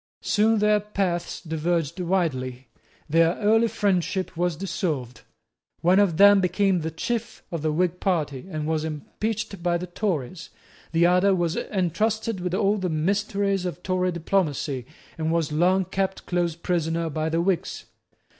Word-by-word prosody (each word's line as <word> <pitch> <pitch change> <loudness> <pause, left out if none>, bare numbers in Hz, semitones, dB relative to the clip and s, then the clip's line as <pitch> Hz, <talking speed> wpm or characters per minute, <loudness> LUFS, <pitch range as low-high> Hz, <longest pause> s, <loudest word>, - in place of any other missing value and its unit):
Soon 220 +2 +3
their 210 0 +3
paths 190 -4 -2
diverged 165 0 -1
widely. 135 -9 -1 0.4
Their 165 +2 +3
early 225 +2 +3
friendship 190 -3 -1
was 175 0 0
dissolved. 155 - -3 0.6
One 180 +3 +4
of 190 -6 +2
them 200 0 +7
became 190 0 +2
the 160 - -2
chief 230 +7 -4
of 165 -3 -3
the 155 0 0
Whig 180 +2 0
party, 150 -7 -1
and 155 -4 -3
was 155 0 0
impeached 200 +6 -4
by 175 0 +1
the 175 - -5
Tories. 175 - -3 0.4
The 170 +1 +3
other 180 +2 +4
was 175 -2 0
entrusted 210 +3 -1
with 180 0 -2
all 205 +1 +2
the 185 -1 -1
mysteries 195 +4 0
of 180 0 -5
Tory 185 0 0
diplomacy, 155 -7 -1 0.3
and 160 0 0
was 165 -3 0
long 180 +5 +3
kept 190 +1 -2
close 175 -2 0
prisoner 165 -1 -1
by 155 +2 -1
the 165 +1 0
Whigs. 180 0 -1
175 Hz, 150 wpm, -25 LUFS, 160-195 Hz, 0.6 s, them